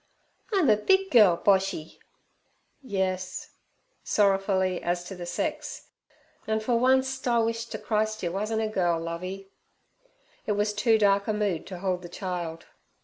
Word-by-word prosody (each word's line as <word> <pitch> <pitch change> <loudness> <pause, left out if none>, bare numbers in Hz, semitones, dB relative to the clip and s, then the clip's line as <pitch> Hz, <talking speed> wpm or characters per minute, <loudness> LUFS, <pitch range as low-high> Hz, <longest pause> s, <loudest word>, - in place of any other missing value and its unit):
'I'm 380 -7 +3
a 210 - +5
big 385 - +2
girl, 210 -8 +6
Boshy.' 190 -5 +1 0.8
'Yes' 190 -6 -3 0.5
sorrowfully 195 -2 +1
as 175 0 -1
to 190 - -8
the 175 -1 -7
sex; 300 - -4 0.6
'an' 220 0 +1
fer 220 +3 -1
oncet 260 +2 +2
I 240 -1 +3
wish 230 0 0
ter - - -5
Christ 215 -1 -1
yer 170 - -1
wuzn't 215 +4 -1
a - - 0
girl, 175 -5 +1
Lovey.' 185 +4 -6 1.0
It 210 - +2
was 210 +1 0
too 220 +2 +3
dark 200 -1 +3
a 215 - +1
mood 205 -6 -1
to 185 - -7
hold 180 0 -2
the 175 - -9
child. 175 -3 -5
200 Hz, 150 wpm, -27 LUFS, 185-225 Hz, 1.0 s, girl